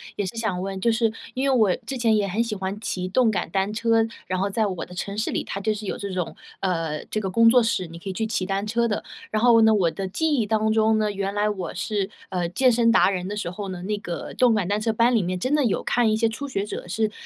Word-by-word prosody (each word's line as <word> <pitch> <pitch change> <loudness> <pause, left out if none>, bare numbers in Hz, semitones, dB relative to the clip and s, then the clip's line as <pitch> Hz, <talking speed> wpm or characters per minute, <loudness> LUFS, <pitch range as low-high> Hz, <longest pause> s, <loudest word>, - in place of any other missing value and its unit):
也 205 - -1
是 185 - -6
想 215 -6 -1
问。 195 0 -4
就 235 - +3
是 225 -1 +1 0.2
因 270 +2 0
为 270 - +3
我 215 -7 +4
之 265 - -4
前 230 -3 +2
也 205 -1 +1
很 210 +5 0
喜 230 -2 -3
欢 190 +1 -4
骑 185 -4 -3
动 235 +5 +3
感 215 - -1
单 195 +1 0
车， 225 +1 +2 0.2
然 185 -1 -2
后 200 +1 0
在 220 +2 +1
我 185 -4 -3
的 180 - -10
城 200 +2 -4
市 215 - -1
里， - - -1
它 195 - -5
就 215 +1 +1
是 210 0 -7
有 - - -2
这 200 -1 -5
种， 180 -2 -3 0.3
呃， 165 -5 -2
这 215 - -3
个 190 - -2
工 230 +5 +4
作 245 +1 +7
室， 225 -5 0
你 165 +1 -10
可 195 - -7
以 - - -3
去 220 +4 -1
骑 195 -4 -2
单 195 +1 -1
车 235 +2 +1
的。 210 - -2 0.3
然 215 +1 -1
后 235 -2 +6
呢， 220 0 +6
我 180 -5 +2
的 190 +4 -4
记 315 - 0
忆 230 -7 +1
当 220 0 +1
中 220 0 +3
呢， 210 -1 +1
原 200 0 -3
来 210 +1 +2
我 190 -5 -3
是， 200 +1 -2 0.2
呃， 175 -2 -1
健 255 +7 +3
身 230 0 +3
达 215 -4 +5
人 180 -1 -3
的 210 +1 -4
时 175 - -3
候 195 +1 -6
呢， 180 -1 -6
那 210 +2 -1
个 175 -4 -6
动 245 -3 +4
感 200 -4 0
单 205 +2 0
车 225 +1 +1
班 235 +3 +3
里 225 - +3
面 180 +1 -2
真 255 +9 -1
的 300 -1 +3
有 220 - 0
看 235 -3 +2
一 - - +2
些 225 +1 +2
初 280 +6 -5
学 200 -6 -2
者 205 - -6
是 215 +4 0
210 Hz, 315 characters per minute, -24 LUFS, 190-225 Hz, 0.3 s, 作